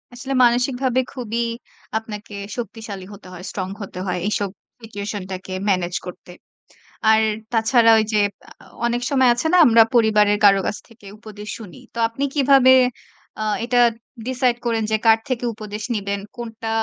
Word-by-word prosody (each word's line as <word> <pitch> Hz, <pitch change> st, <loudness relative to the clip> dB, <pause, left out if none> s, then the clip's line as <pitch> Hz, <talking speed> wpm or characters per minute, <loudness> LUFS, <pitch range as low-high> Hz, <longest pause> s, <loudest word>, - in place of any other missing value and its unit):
আসলে 265 Hz, +2 st, -5 dB
মানসিকভাবে 245 Hz, +1 st, +2 dB
খুবই 235 Hz, -3 st, -4 dB, 0.6 s
আপনাকে 215 Hz, -1 st, -8 dB, 0.2 s
শক্তিশালী 220 Hz, -4 st, -6 dB
হতে 200 Hz, -2 st, -13 dB
হয়, 180 Hz, 0 st, -9 dB
স্ট্রং 185 Hz, -2 st, -4 dB
হতে 195 Hz, -2 st, -7 dB
হয় 180 Hz, 0 st, -1 dB
এইসব 205 Hz, -1 st, -1 dB, 0.3 s
সিচুয়েশন 205 Hz, -2 st, -6 dB
টাকে 185 Hz, 0 st, -7 dB, 0.2 s
ম্যানেজ 180 Hz, -2 st, 0 dB
করতে। 180 Hz, 0 st, -10 dB, 0.8 s
আর 220 Hz, 0 st, +5 dB, 0.3 s
তাছাড়া 230 Hz, 0 st, +4 dB
ওই 220 Hz, -, +2 dB
যে 215 Hz, -, +3 dB, 0.3 s
আ -, -, -15 dB
আ -, -, -19 dB, 0.2 s
অনেক 240 Hz, 0 st, 0 dB
সময় 260 Hz, -2 st, +4 dB
আছে 240 Hz, +6 st, -2 dB
না? -, -, +5 dB
আমরা 230 Hz, -1 st, +7 dB
পরিবারের 210 Hz, -3 st, +4 dB
কারো 195 Hz, -1 st, +6 dB
কাছ -, -, -2 dB
থেকে 230 Hz, -3 st, -18 dB
উপদেশ 210 Hz, -1 st, -10 dB
শুনি। 220 Hz, 0 st, -11 dB, 0.2 s
তো -, -, -7 dB
আপনি 230 Hz, +5 st, -3 dB
কিভাবে 270 Hz, -2 st, +5 dB, 0.7 s
আ -, -, -1 dB, 0.2 s
এটা 245 Hz, +1 st, +1 dB, 0.5 s
ডিসাইড 255 Hz, -1 st, +1 dB
করেন 230 Hz, -1 st, 0 dB
যে 220 Hz, -, +3 dB
কার 225 Hz, 0 st, +6 dB
থেকে 250 Hz, -2 st, -2 dB
উপদেশ 210 Hz, 0 st, -7 dB
নিবেন, 200 Hz, -1 st, -2 dB, 0.2 s
কোনটা 225 Hz, -2 st, -7 dB
225 Hz, 160 wpm, -21 LUFS, 205-245 Hz, 0.8 s, আমরা